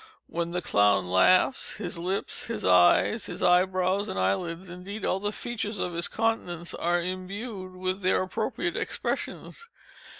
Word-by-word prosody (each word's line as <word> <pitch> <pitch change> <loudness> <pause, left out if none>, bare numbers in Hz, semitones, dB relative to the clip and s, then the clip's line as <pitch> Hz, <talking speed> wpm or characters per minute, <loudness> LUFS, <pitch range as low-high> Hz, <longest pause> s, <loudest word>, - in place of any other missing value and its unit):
When 170 0 -3
the 180 0 -3
clown 100 - +3
laughs, 185 - +3
his 205 -5 -5
lips, 185 +3 -2
his 230 - -4
eyes, 90 -1 +4
his - - -5
eye 180 +1 +6
brows, 185 +2 0
and - - -4
eyelids—indeed, 175 - -2
all 190 - +1
the 205 +1 -2
features 215 -2 -4
of 180 -2 -2
his 170 0 -1
countenance—are 175 -6 -1
imbued 185 +2 -5
with 185 +1 -3
their 185 0 +2
appropriate 230 - -2
expressions. 460 - -4
185 Hz, 140 wpm, -27 LUFS, 170-205 Hz, -, eye